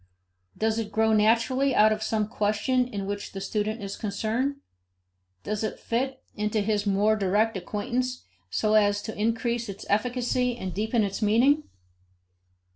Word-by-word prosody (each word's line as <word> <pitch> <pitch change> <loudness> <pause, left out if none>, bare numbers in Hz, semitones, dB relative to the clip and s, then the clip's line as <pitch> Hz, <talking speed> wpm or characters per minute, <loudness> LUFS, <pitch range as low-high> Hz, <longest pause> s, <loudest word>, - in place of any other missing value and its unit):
Does 220 +1 +1
it 220 -2 -4
grow 220 0 +2
naturally 230 +5 +3
out 215 +1 +6
of 215 0 -1
some 220 -1 0
question 235 +4 0
with 205 - -3
which 200 +1 -4
the 195 - -5
student 210 +2 -2
is 200 0 -5
concerned? 225 +6 -1 0.9
Does 215 0 -2
it 215 - -3
fit 260 +3 -2
into 210 +1 -1
his 205 0 0
more 205 +2 +3
direct 210 +2 +1
acquaintance 245 +6 -2 0.3
so 215 - +1
as 205 -1 +3
to 220 - -5
increase 230 +1 -1
its 200 +1 -7
efficacy 245 +2 +1
and 190 -5 -5
deepen 220 +2 +1
its 200 +1 -3
meaning? 250 +8 +3
215 Hz, 150 wpm, -26 LUFS, 205-235 Hz, 0.9 s, out